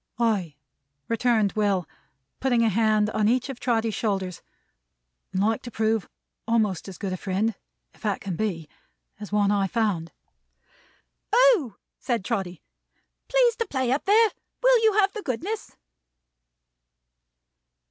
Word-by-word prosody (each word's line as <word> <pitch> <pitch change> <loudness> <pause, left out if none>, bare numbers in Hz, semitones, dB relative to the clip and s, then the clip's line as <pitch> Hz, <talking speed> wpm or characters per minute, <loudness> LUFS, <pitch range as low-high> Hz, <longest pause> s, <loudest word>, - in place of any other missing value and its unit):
"Ay," 205 -10 0 0.5
returned 230 -3 +2
Will, 200 -4 0 0.5
putting 245 -3 +2
a 225 - +3
hand 215 0 +2
on 215 -1 +1
each 250 +4 +1
of 265 -3 -6
Trotty's 230 -3 0
shoulders. 190 -5 -2 0.9
"And 190 - 0
like 220 +1 +1
to 245 - -8
prove 220 -2 0 0.4
a'most 215 -7 +1
as 190 -2 -8
good 195 -3 -3
a - - -3
friend, 200 +4 -1 0.4
if - - -24
that 210 -3 -1
can 190 -3 -4
be, 170 -6 -2 0.5
as 210 -1 -8
one 205 -1 +2
I 200 -1 +2
found." 195 -7 -1 1.2
"O!" 445 - +4 0.2
said 235 -7 -2
Trotty. 190 -7 -3 0.6
"Please - - +3
to 460 - -2
play 260 -6 -1
up 275 - 0
there. 430 +2 +5 0.3
Will - - +5
you 440 -1 +5
have 395 -1 +3
the 430 - -5
goodness?" 385 - -4
220 Hz, 135 wpm, -25 LUFS, 200-260 Hz, 1.2 s, there